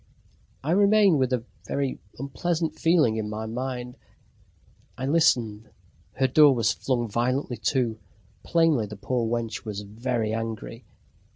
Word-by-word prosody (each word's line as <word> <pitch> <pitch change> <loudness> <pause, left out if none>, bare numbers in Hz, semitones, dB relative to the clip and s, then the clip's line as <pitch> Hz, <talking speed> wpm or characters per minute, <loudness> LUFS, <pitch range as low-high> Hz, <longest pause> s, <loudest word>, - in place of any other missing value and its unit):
I 150 - -1
remained 200 -3 +5
with 130 -1 +1
a 125 -3 0 0.2
very 140 -2 -2 0.2
unpleasant 160 +5 -2
feeling 160 -10 +3
in 105 -1 -3
my 110 +1 -4
mind. 125 +1 -5 1.0
I 130 - -3
listened. 120 -8 +2 0.4
Her 130 - +1
door 145 +1 +6
was 115 -5 +2
flung 120 -3 -1
violently 120 +3 -1
to 120 -5 +1 0.4
plainly 165 -10 +2
the 105 - -8
poor 115 +3 -1
wench 115 -2 -3
was 105 -2 -5
very 110 +2 -2
angry... 115 -1 -5
125 Hz, 130 wpm, -26 LUFS, 110-140 Hz, 1.0 s, door